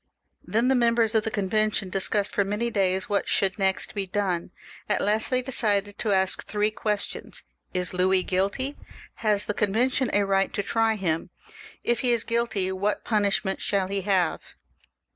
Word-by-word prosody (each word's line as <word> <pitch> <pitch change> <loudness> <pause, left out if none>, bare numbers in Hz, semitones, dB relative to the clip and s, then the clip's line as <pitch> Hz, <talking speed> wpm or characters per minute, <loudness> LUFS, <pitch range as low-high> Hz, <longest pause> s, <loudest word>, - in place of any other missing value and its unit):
Kien 230 +3 +3
the 265 - +4
members 235 -2 +3
of 220 - +4
the - - +1
Convention 210 -1 0
discussed 200 +1 0
for 200 - +1
many 210 +4 -2
days 190 -2 +1
what 200 -1 -1
should 195 0 +1
next 190 -1 0
be 200 -2 -3
done. 185 -3 -1 0.4
At - - +2
last 215 +2 +1
they 255 -1 0
decided 205 -5 +1
to 215 - 0
ask 190 -1 +1
three 210 0 0
questions: 210 -1 -3
— - - -43
Is 180 0 0
Louis 185 +1 +2
guilty? 200 +9 -1 0.4
Has 210 -2 +1
the 210 - -1
Convention 240 +5 +1
a 205 - +3
right 195 0 +1
to 205 - -1
try 225 +2 +1
him? 165 -5 -2 0.5
If 235 - +1
he 245 -2 +2
is 230 -1 0
guUty, 230 -5 0
what 200 +3 -1
puiushment 205 -2 +1
shaU 200 -2 0
he 195 +1 -2
have 185 -4 +1
205 Hz, 175 wpm, -26 LUFS, 190-220 Hz, 0.5 s, the